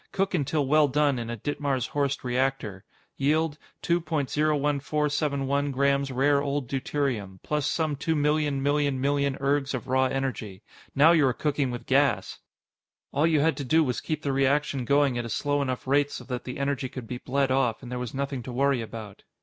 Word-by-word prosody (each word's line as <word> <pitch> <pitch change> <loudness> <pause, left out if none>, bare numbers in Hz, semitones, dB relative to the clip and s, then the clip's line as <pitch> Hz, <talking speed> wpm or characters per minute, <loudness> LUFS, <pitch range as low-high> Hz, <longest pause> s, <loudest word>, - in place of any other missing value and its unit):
Cook 195 0 -1
until 145 0 0
well 150 +2 +4
done 140 -1 +1
in 115 -1 -5
a 120 - -4
Ditmars 140 0 -2
Horst 140 -1 -1
reactor. 125 -6 -1 0.3
Yield: 155 +2 +1 0.2
2.01471 145 -2 0
gms. 140 -1 +1
rare 140 +2 +3
old 140 -2 -2
deuterium 130 -7 -2
plus 150 -1 -1
some 155 -3 0
two 155 +3 -1
million 150 -2 +1
million 145 -1 +1
million 140 0 +1
ergs 140 0 0
of 125 - -5
raw 130 +1 +3
energy. 130 -7 -3 0.3
Now 150 +4 +7
you 155 -5 +4
are 125 - +1
cooking 145 -1 -1
with 120 -1 -6
gas! - - +1 0.7
All 150 +4 +2
you 155 -3 +3
had 160 +2 +2
to 140 - -3
do 160 +5 +3
was 125 -5 -2
keep 155 -1 -3
the 140 - 0
reaction 135 -1 +1
going 140 -1 +2
at 120 - -3
a - - -5
slow 145 +5 0
enough 130 -2 -3
rate 140 +2 +2
so 125 - -7
that 125 -1 -5
the 125 - -5
energy 140 -1 -1
could 130 -2 -7
be 125 +2 -6
bled 135 +1 0
off, 130 -3 +1
and 125 - -8
there 125 - -3
was 125 -1 -5
nothing 140 -1 -2
to 125 - -7
worry 135 0 +1
about. 110 -3 -8
140 Hz, 190 wpm, -26 LUFS, 130-145 Hz, 0.7 s, Now